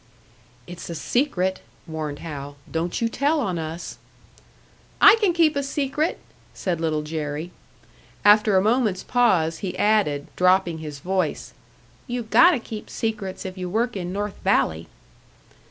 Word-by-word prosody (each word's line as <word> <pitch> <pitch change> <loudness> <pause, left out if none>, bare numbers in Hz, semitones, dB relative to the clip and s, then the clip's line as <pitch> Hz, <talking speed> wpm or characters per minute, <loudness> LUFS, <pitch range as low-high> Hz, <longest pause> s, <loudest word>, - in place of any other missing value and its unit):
"It's 175 0 -9
a 170 - -4
secret," 190 - 0 0.2
warned 155 -2 -5
Hal. 145 -2 -7 0.2
"Don't 165 +5 -2
you - - +3
tell 285 +7 +1
on 185 -10 -1
us!" 160 +2 -6 1.0
"I - - +9
can 405 -4 +4
keep 330 -3 +3
a 280 - +1
secret," 280 +3 -1 0.4
said 175 -4 -2
Little 155 -2 0
Jerry. 150 +1 -4 0.7
After 210 -1 +6
a 185 - +3
moment's 220 -4 +1
pause 180 -10 +2
he 190 -3 -4
added, 200 -10 +2
dropping 180 -2 +3
his 150 -2 -7
voice, 185 -2 -2 0.5
"You 245 -1 -3
gotta 335 +9 +5
keep 225 -2 -8
secrets 215 -5 -4
if 185 0 -6
you 180 -1 -4
work 230 +5 0
in 180 -2 -4
North 205 +1 -4
Valley." 80 - +1
190 Hz, 140 wpm, -23 LUFS, 160-230 Hz, 1.0 s, I